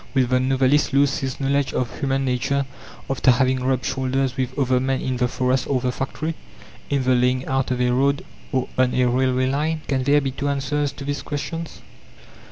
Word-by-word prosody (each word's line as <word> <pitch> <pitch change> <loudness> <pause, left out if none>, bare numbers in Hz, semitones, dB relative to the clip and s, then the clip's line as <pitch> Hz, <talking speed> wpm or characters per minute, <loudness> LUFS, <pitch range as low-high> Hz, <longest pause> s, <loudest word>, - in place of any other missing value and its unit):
Will 130 -1 +4
the 125 +1 +2
novelist 135 +2 +2
lose 140 0 +3
his 130 -1 -4
knowledge 140 0 0
of 125 -3 -2
human 135 -1 0
nature 140 +2 0 0.4
after 135 -1 +1
having 130 +1 +3
rubbed 130 -1 0
shoulders 130 0 -1
with 130 -1 -3
other 130 -2 +2
men 130 +1 0
in 130 -1 -2
the 125 0 +2
forest 125 +1 0
or 135 -2 +1
the 125 0 -1
factory, 150 +5 -3 0.6
in 140 -2 +1
the 130 0 +3
laying 125 +1 +2
out 135 0 0
of 125 -1 -1
a 125 0 +2
road 140 +3 +1 0.3
or 130 -1 0
on 130 -1 +3
a 125 - +3
railway 130 +1 +2
line? 150 +4 0
Can 135 -2 0
there 145 +2 +4
be 135 -2 -2
two 135 +2 -3
answers 145 +1 -1
to 140 - -8
these 145 -1 -2
questions? 160 +4 -5
130 Hz, 200 wpm, -22 LUFS, 130-140 Hz, 0.6 s, Will